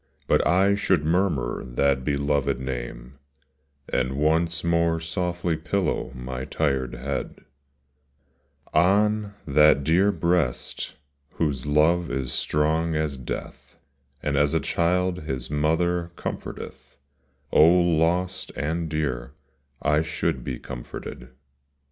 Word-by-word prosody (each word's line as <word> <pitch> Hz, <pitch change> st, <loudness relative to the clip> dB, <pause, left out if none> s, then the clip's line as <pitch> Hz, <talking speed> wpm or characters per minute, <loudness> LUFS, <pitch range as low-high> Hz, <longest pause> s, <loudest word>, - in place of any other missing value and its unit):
But -, -, +3 dB
I 95 Hz, +4 st, +4 dB
should 95 Hz, -6 st, +1 dB
murmur 80 Hz, -8 st, 0 dB
that 65 Hz, +1 st, +1 dB
beloved 70 Hz, -1 st, 0 dB
name, 65 Hz, 0 st, -6 dB, 0.7 s
And 65 Hz, +1 st, 0 dB
once 80 Hz, +3 st, +1 dB
more 85 Hz, -1 st, +2 dB
softly 85 Hz, +1 st, -2 dB
pillow 75 Hz, -, -1 dB
my 65 Hz, 0 st, -5 dB
tired 65 Hz, -6 st, -1 dB
head 65 Hz, +3 st, -4 dB, 1.3 s
On 105 Hz, +4 st, +3 dB
that 75 Hz, -1 st, +5 dB
dear 90 Hz, +7 st, +4 dB
breast 85 Hz, -9 st, -1 dB, 0.4 s
whose 75 Hz, -4 st, -1 dB
love 80 Hz, +4 st, +3 dB
is 65 Hz, -1 st, -2 dB
strong 80 Hz, +2 st, +1 dB
as 75 Hz, -2 st, -1 dB
death, 65 Hz, -2 st, -7 dB, 0.5 s
And 75 Hz, -1 st, 0 dB
as 75 Hz, 0 st, +2 dB
a -, -, +4 dB
child 90 Hz, +1 st, 0 dB
his 65 Hz, -4 st, -4 dB
mother 85 Hz, +3 st, +1 dB
comforteth -, -, -7 dB, 0.3 s
— 70 Hz, +1 st, -41 dB
Oh 80 Hz, -, +7 dB
lost 85 Hz, +2 st, +1 dB
and 80 Hz, +3 st, -2 dB
dear, 70 Hz, -5 st, -2 dB, 0.5 s
I 75 Hz, 0 st, +3 dB
should 75 Hz, -5 st, -2 dB
be -, -, -4 dB
comforted. -, -, -8 dB
75 Hz, 110 wpm, -25 LUFS, 70-85 Hz, 1.3 s, Oh